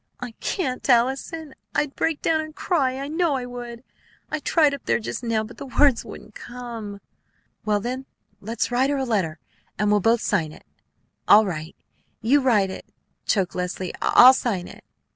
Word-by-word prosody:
"I 250 Hz, -1 st, -6 dB
can't, 270 Hz, -9 st, -3 dB
Allison; 265 Hz, +5 st, +1 dB, 0.2 s
I'd 295 Hz, -1 st, 0 dB
break 325 Hz, -2 st, -1 dB
down 320 Hz, -1 st, +2 dB
and 310 Hz, 0 st, -9 dB
cry, 270 Hz, -8 st, 0 dB
I 275 Hz, +1 st, -4 dB
know 320 Hz, -1 st, +1 dB
I 255 Hz, -2 st, -3 dB
would. 240 Hz, -1 st, -8 dB, 0.5 s
I 305 Hz, -, -1 dB
tried 300 Hz, -1 st, +3 dB
up 280 Hz, -, -7 dB
there 115 Hz, -, +2 dB
just 115 Hz, +2 st, -5 dB
now, 230 Hz, -2 st, 0 dB
but 220 Hz, -, -11 dB
the -, -, -8 dB
words 280 Hz, -5 st, +5 dB
wouldn't 210 Hz, +1 st, -11 dB
come." 230 Hz, -5 st, -8 dB, 0.7 s
"Well, 210 Hz, -1 st, +2 dB
then, 255 Hz, +5 st, -5 dB, 0.3 s
let's 230 Hz, +4 st, -3 dB
write 255 Hz, +3 st, +2 dB
her 285 Hz, -, 0 dB
a 270 Hz, -, -1 dB
letter! 190 Hz, -10 st, -1 dB, 0.4 s
And 210 Hz, 0 st, +1 dB
we'll 210 Hz, -, +4 dB
both 225 Hz, +3 st, +2 dB
sign 165 Hz, -7 st, 0 dB
it." -, -, -16 dB, 0.6 s
"All 215 Hz, +1 st, +7 dB
right. 160 Hz, -4 st, -5 dB, 0.4 s
You 275 Hz, +6 st, +3 dB
write 210 Hz, -7 st, +2 dB
it," -, -, -9 dB, 0.4 s
choked 190 Hz, -5 st, +1 dB
Leslie. 180 Hz, 0 st, -4 dB
"I'll 255 Hz, +2 st, +8 dB
sign 205 Hz, -9 st, -2 dB
it." -, -, -13 dB
240 Hz, 180 wpm, -23 LUFS, 205-275 Hz, 0.7 s, I'll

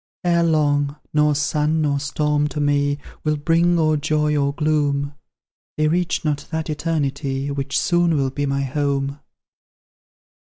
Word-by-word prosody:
Ere 170 Hz, -1 st, +3 dB
long, 145 Hz, -3 st, +2 dB, 0.2 s
nor 150 Hz, -1 st, +3 dB
sun 150 Hz, +2 st, +1 dB
nor 145 Hz, -2 st, +1 dB
storm 150 Hz, +1 st, 0 dB
to 150 Hz, -, -5 dB
me 145 Hz, 0 st, +1 dB, 0.3 s
Will 155 Hz, -1 st, +1 dB
bring 170 Hz, +3 st, +2 dB
or 155 Hz, -1 st, +2 dB
joy 150 Hz, 0 st, +1 dB
or 140 Hz, -1 st, +1 dB
gloom; 145 Hz, -2 st, 0 dB, 0.6 s
They 155 Hz, 0 st, +2 dB
reach 175 Hz, 0 st, 0 dB
not 145 Hz, -2 st, -1 dB
that 160 Hz, -1 st, -3 dB
Eternity 140 Hz, -3 st, -2 dB
Which 140 Hz, 0 st, -2 dB
soon 175 Hz, -2 st, +2 dB
will 135 Hz, -2 st, 0 dB
be 145 Hz, +1 st, -2 dB
my 140 Hz, 0 st, 0 dB
home." 140 Hz, 0 st, -1 dB
150 Hz, 145 wpm, -21 LUFS, 140-155 Hz, 0.6 s, Ere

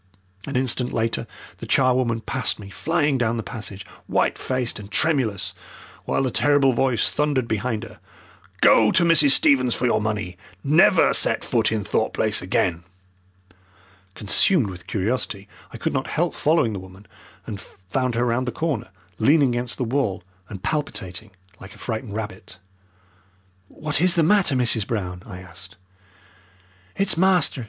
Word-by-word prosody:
An 140 Hz, -, -5 dB
instant 125 Hz, -1 st, +1 dB
later 115 Hz, 0 st, -2 dB, 0.3 s
the -, -, -8 dB
charwoman 125 Hz, -3 st, +2 dB
passed 125 Hz, +1 st, -1 dB
me, 100 Hz, -2 st, -11 dB
flying 150 Hz, -2 st, 0 dB
down 120 Hz, -1 st, 0 dB
the 115 Hz, -, -3 dB
passage, 105 Hz, -4 st, -6 dB, 0.2 s
white -, -, +1 dB
faced 130 Hz, -4 st, -2 dB
and 100 Hz, -1 st, -10 dB
tremulous, 110 Hz, -, 0 dB, 0.5 s
while -, -, 0 dB
the 130 Hz, -, -1 dB
terrible 145 Hz, -1 st, +3 dB
voice 125 Hz, -1 st, +1 dB
thundered 145 Hz, -5 st, 0 dB
behind 110 Hz, +1 st, -2 dB
her. 115 Hz, -, -12 dB, 0.6 s
"Go -, -, +6 dB
to 175 Hz, -, +3 dB
Mrs. 165 Hz, -4 st, +5 dB
Stevens 130 Hz, -3 st, +4 dB
for 125 Hz, -, -2 dB
your 120 Hz, -, +2 dB
money! 105 Hz, -4 st, -3 dB, 0.3 s
Never 150 Hz, +4 st, +4 dB
set -, -, +2 dB
foot -, -, +1 dB
in 110 Hz, -2 st, -1 dB
Thorpe -, -, -1 dB
Place -, -, +1 dB
again!" 85 Hz, -1 st, -1 dB, 1.3 s
Consumed 110 Hz, -, +2 dB
with 90 Hz, -1 st, -11 dB
curiosity, 100 Hz, -1 st, -2 dB, 0.2 s
I -, -, -8 dB
could -, -, -2 dB
not -, -, -2 dB
help -, -, -1 dB
following 150 Hz, -8 st, +1 dB
the 100 Hz, -, -4 dB
woman, 95 Hz, +2 st, -14 dB, 0.4 s
and 100 Hz, -2 st, -6 dB
found 115 Hz, +7 st, -4 dB
her 120 Hz, +1 st, +1 dB
round 125 Hz, +2 st, 0 dB
the -, -, -1 dB
corner 150 Hz, -3 st, -3 dB, 0.3 s
leaning 140 Hz, +3 st, +4 dB
against 120 Hz, 0 st, -2 dB
the 130 Hz, -, -1 dB
wall 115 Hz, -7 st, -1 dB, 0.3 s
and 95 Hz, -2 st, -9 dB
palpitating 110 Hz, -, -4 dB, 0.3 s
like 95 Hz, -, -12 dB
a -, -, -16 dB
frightened 110 Hz, -2 st, -5 dB
rabbit. 105 Hz, -3 st, -7 dB, 1.1 s
"What 150 Hz, +4 st, -2 dB
is 180 Hz, 0 st, +3 dB
the 165 Hz, -, +3 dB
matter, 180 Hz, -4 st, +3 dB
Mrs. 115 Hz, -4 st, +1 dB
Brown?" 90 Hz, -5 st, -4 dB
I 90 Hz, -5 st, -9 dB
asked. 90 Hz, 0 st, -12 dB, 1.2 s
"It's 195 Hz, 0 st, +2 dB
master!" 180 Hz, -6 st, +3 dB
120 Hz, 155 wpm, -22 LUFS, 105-140 Hz, 1.3 s, Go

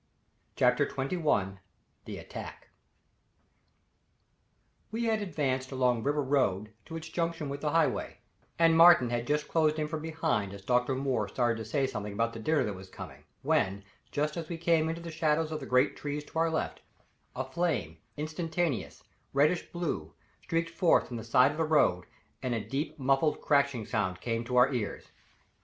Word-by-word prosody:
CHAPTER 125 Hz, +3 st, +3 dB
XXI 135 Hz, -, -1 dB, 0.5 s
The -, -, -6 dB
Attack -, -, -9 dB, 2.2 s
We 225 Hz, +2 st, -2 dB
had 220 Hz, -2 st, +1 dB
advanced 140 Hz, -8 st, -2 dB
along 125 Hz, -3 st, +1 dB
River 145 Hz, +3 st, 0 dB
Road 110 Hz, -7 st, 0 dB
to 165 Hz, -, -8 dB
its 165 Hz, 0 st, -6 dB
junction 165 Hz, -2 st, -2 dB
with 140 Hz, +1 st, -5 dB
the 150 Hz, -, 0 dB
Highway, 165 Hz, 0 st, +1 dB, 0.4 s
and 165 Hz, -1 st, +5 dB
Martin 165 Hz, -7 st, +7 dB
had 120 Hz, 0 st, -2 dB
just 150 Hz, 0 st, 0 dB
closed 155 Hz, -1 st, +2 dB
in 155 Hz, -1 st, -1 dB
from 155 Hz, 0 st, -4 dB
behind 155 Hz, -11 st, -1 dB
as 100 Hz, 0 st, -13 dB
Dr. 125 Hz, +2 st, +2 dB
Moore 130 Hz, -6 st, 0 dB
started 120 Hz, +2 st, 0 dB
to 110 Hz, -, -5 dB
say 135 Hz, +3 st, +1 dB
something 105 Hz, -5 st, -4 dB
about 115 Hz, +2 st, 0 dB
the 115 Hz, -, -7 dB
dinner 155 Hz, +6 st, +2 dB
that 105 Hz, -, -2 dB
was 95 Hz, 0 st, -11 dB
coming, -, -, -10 dB, 0.2 s
when, 100 Hz, +1 st, +1 dB, 0.3 s
just 150 Hz, +2 st, -1 dB
as 165 Hz, -2 st, -5 dB
we 170 Hz, -, -4 dB
came 165 Hz, -1 st, +2 dB
into 165 Hz, +1 st, -4 dB
the 170 Hz, 0 st, -7 dB
shadows 155 Hz, 0 st, +1 dB
of 155 Hz, -, -3 dB
the -, -, -8 dB
great 125 Hz, +2 st, +3 dB
trees 145 Hz, 0 st, -4 dB
to 160 Hz, -, -5 dB
our 165 Hz, 0 st, +3 dB
left, 160 Hz, -, -2 dB, 0.5 s
a 130 Hz, -, -2 dB
flame, 130 Hz, -, -2 dB, 0.2 s
instantaneous, 160 Hz, -1 st, -2 dB, 0.3 s
reddish 150 Hz, +5 st, +2 dB
blue, 145 Hz, -, -3 dB, 0.3 s
streaked 165 Hz, 0 st, -1 dB
forth 170 Hz, 0 st, +3 dB
from 120 Hz, -, -5 dB
the 110 Hz, -, -6 dB
side 125 Hz, +4 st, +4 dB
of 150 Hz, -, -7 dB
the 165 Hz, -, +1 dB
road 145 Hz, -, +3 dB, 0.4 s
and 125 Hz, -2 st, -1 dB
a -, -, 0 dB
deep, 145 Hz, +3 st, -3 dB
muffled, 135 Hz, +2 st, +2 dB
crashing 140 Hz, -6 st, +2 dB
sound 95 Hz, -4 st, -1 dB
came 115 Hz, +1 st, -2 dB
to 125 Hz, +2 st, -4 dB
our 125 Hz, +2 st, +5 dB
ears. 115 Hz, -5 st, -4 dB
140 Hz, 175 wpm, -30 LUFS, 120-160 Hz, 2.2 s, Martin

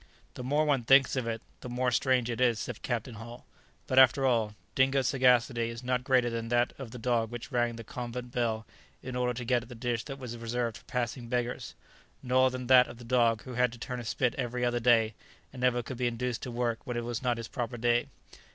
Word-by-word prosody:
] -, -, -33 dB
"The 125 Hz, -, -7 dB
more 145 Hz, +4 st, +2 dB
one 140 Hz, -5 st, +2 dB
thinks 135 Hz, +3 st, +5 dB
of 130 Hz, -3 st, -1 dB
it, 115 Hz, -1 st, -3 dB, 0.2 s
the 125 Hz, -, -8 dB
more 125 Hz, +1 st, 0 dB
strange 125 Hz, 0 st, +2 dB
it 120 Hz, 0 st, -3 dB
is," 120 Hz, -3 st, +3 dB
said 115 Hz, +1 st, -5 dB
Captain 120 Hz, 0 st, -3 dB
Hull; 115 Hz, +2 st, -10 dB, 0.4 s
"but, 130 Hz, -, +4 dB
after 130 Hz, +1 st, +6 dB
all, 115 Hz, -4 st, +1 dB, 0.2 s
Dingo's 135 Hz, -1 st, +3 dB
sagacity 125 Hz, -2 st, +3 dB
is 115 Hz, +1 st, -7 dB
not 125 Hz, 0 st, 0 dB
greater 125 Hz, -2 st, +3 dB
than 115 Hz, 0 st, -3 dB
that 120 Hz, +1 st, +2 dB
of 135 Hz, -4 st, -6 dB
the 125 Hz, -, -9 dB
dog 115 Hz, -1 st, 0 dB
which 120 Hz, +4 st, -7 dB
rang 120 Hz, -2 st, +1 dB
the 115 Hz, -, -8 dB
convent 120 Hz, +1 st, -6 dB
bell 115 Hz, -3 st, -1 dB, 0.4 s
in 130 Hz, -1 st, -5 dB
order 125 Hz, -1 st, 0 dB
to 125 Hz, 0 st, -5 dB
get 120 Hz, 0 st, +2 dB
at 115 Hz, -, -13 dB
the 125 Hz, -, -9 dB
dish 115 Hz, 0 st, -2 dB
that 135 Hz, -1 st, -6 dB
was 125 Hz, -3 st, -6 dB
reserved 115 Hz, 0 st, -2 dB
for -, -, -19 dB
passing 120 Hz, 0 st, -3 dB
beggars; 120 Hz, 0 st, -3 dB, 0.5 s
nor 130 Hz, +1 st, +4 dB
than 130 Hz, 0 st, -5 dB
that 125 Hz, 0 st, +7 dB
of -, -, -10 dB
the 120 Hz, -, -11 dB
dog 115 Hz, -2 st, +2 dB
who 130 Hz, -, -8 dB
had 125 Hz, 0 st, +2 dB
to -, -, -10 dB
turn 125 Hz, +1 st, -5 dB
a -, -, -6 dB
spit 120 Hz, +1 st, 0 dB
every 125 Hz, 0 st, -1 dB
other 120 Hz, 0 st, +1 dB
day, 115 Hz, -2 st, +4 dB, 0.4 s
and 125 Hz, -, -8 dB
never 125 Hz, -1 st, +2 dB
could 120 Hz, +2 st, -7 dB
be 125 Hz, 0 st, +1 dB
induced 120 Hz, 0 st, -2 dB
to 125 Hz, -, -5 dB
work 120 Hz, -1 st, -1 dB
when 125 Hz, -3 st, -4 dB
it 120 Hz, -, -3 dB
was 120 Hz, +1 st, -3 dB
not 125 Hz, -2 st, 0 dB
his 115 Hz, -1 st, -5 dB
proper 120 Hz, -2 st, -4 dB
day. 120 Hz, +1 st, +2 dB
120 Hz, 245 wpm, -30 LUFS, 115-125 Hz, 0.5 s, that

